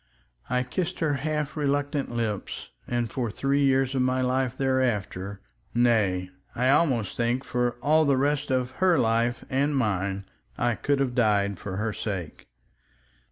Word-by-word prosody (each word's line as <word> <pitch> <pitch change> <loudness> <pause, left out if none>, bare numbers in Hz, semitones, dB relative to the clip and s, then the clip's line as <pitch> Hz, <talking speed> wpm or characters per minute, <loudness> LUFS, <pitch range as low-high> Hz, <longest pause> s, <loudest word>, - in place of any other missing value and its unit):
I 125 0 +1
kissed 185 +7 -3
her 155 -3 +1
half 150 -1 -2
reluctant 145 -1 0
lips, 115 -4 -3 0.2
and 120 -2 -1
for 120 -3 -2
three 140 +6 +1
years 135 -1 +3
of 130 - +1
my 130 0 +1
life 130 0 0
thereafter—nay! 105 -4 0 0.2
I 125 +2 +2
almost 130 - +2
think 120 +2 0
for 125 -1 0
all 155 +2 +4
the 140 -2 +3
rest 145 +1 +1
of 130 -1 0
her 185 -3 +5
life 115 0 +1
and 140 +2 +1
mine—I 100 +2 -2
could 140 +4 0
have 130 -3 0
died 100 -5 +2
for 95 -2 -5
her 105 +1 -1
sake. 95 -8 -5
125 Hz, 145 wpm, -26 LUFS, 110-140 Hz, 0.2 s, her